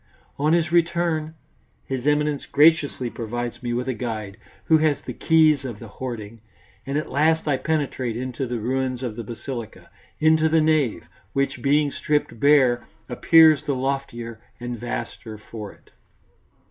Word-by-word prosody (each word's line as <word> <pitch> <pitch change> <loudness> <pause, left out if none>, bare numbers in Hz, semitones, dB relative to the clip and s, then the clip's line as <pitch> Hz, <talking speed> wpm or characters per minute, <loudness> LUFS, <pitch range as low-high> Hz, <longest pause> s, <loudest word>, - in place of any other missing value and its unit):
On 150 +3 +2
his 170 -1 +1
return, 170 -2 +1 0.5
His 130 0 -3
Eminence 150 -1 +1
graciously 145 -5 +3
provides 120 +1 -5
me 120 -1 -3
with 125 +2 -2
a 130 - 0
guide, 110 -4 -5 0.3
who 160 -1 +5
has 155 -3 +2
the - - -5
keys 155 -3 +3
of 120 -5 -6
the 115 - -10
hoarding, 115 -2 -7 0.5
and 140 +1 -1
at 155 - -3
last 160 +2 +2
I 140 -3 +2
penetrate 135 -7 -2
into 130 +1 -4
the 120 -1 -3
ruins 130 +2 -2
of 120 -4 -4
the 115 - -5
basilica, 120 +1 -7 0.3
into 160 0 +4
the 160 +1 +3
nave, 155 -6 +1 0.3
which, 135 0 -1
being 145 +1 +2
stripped 145 -7 -1
bare, 130 -4 +4 0.2
appears 155 +3 +5
the 145 -2 -2
loftier 125 -4 -4 0.2
and 120 0 -4
vaster 115 -2 -6
for 105 -1 -9
it. - - -23
135 Hz, 155 wpm, -23 LUFS, 120-155 Hz, 0.5 s, who